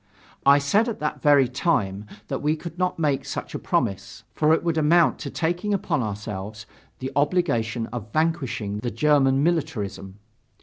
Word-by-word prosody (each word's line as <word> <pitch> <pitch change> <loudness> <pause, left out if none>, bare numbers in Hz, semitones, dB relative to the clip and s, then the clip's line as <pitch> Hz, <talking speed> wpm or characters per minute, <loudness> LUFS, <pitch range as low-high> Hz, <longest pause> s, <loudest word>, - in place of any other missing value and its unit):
I 140 +1 +8
said 200 +12 +2
at 225 - -4
that 150 0 -3
very 145 -3 +5
time, 105 - -1 0.2
that - - -3
we 150 +2 +1
could 170 +2 -9
not 180 0 0
make 150 -4 0
such - - -6
a - - -3
promise, 100 0 -2
for 155 0 +2
it 160 - +3
would 165 -2 0
amount 165 +2 +4
to - - -5
taking 175 +5 -1
upon 160 -7 -1
ourselves 105 0 -5 0.3
the 130 0 -5
obligation 140 -8 +1
of 110 -3 -6
vanquishing 130 -10 -1
the 120 - -3
German 135 +1 +3
militarism. 110 - -2
145 Hz, 165 wpm, -24 LUFS, 110-160 Hz, 0.3 s, I